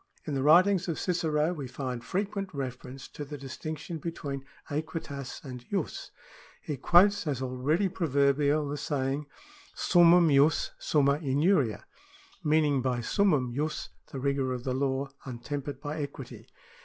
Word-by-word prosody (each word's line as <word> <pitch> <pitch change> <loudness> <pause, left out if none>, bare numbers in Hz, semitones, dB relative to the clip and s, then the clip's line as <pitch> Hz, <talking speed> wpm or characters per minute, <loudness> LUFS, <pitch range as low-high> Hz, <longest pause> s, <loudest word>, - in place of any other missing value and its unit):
In 150 - -3
the 135 - 0
writings 180 +6 +5
of 165 - -2
Cicero 165 -2 +1
we 145 -6 -5
find 125 -2 -5
frequent 195 - -2
reference 130 0 -6
to 150 - -7
the 145 +1 -7
distinc 140 +3 -6
tion 165 +2 -6
between 145 -4 -5 0.3
aequitas 145 -3 -5
and 125 -2 -7
J2is. 195 -6 -3 0.5
He 150 - -4
quotes 180 +7 +4
as 140 -4 -1
already 130 +9 0
pro 180 -2 -2
verbial 145 +1 +2
the 145 +1 -3
saying, 140 0 -2 0.5
Summumjus 165 -4 +5
sumnia 140 -1 +2
injuria,^ 140 - +2 0.6
meaning 150 -3 +3
by 125 -1 0
summum 145 -7 +2
jus 150 +4 -2 0.2
the 135 - -5
rigour 135 -1 0
of 125 -1 -5
the 130 - -1
law 135 +1 0 0.2
untempered 135 +2 -5
by 150 +2 -4
equity. 140 - -8
145 Hz, 145 wpm, -29 LUFS, 135-160 Hz, 0.6 s, writings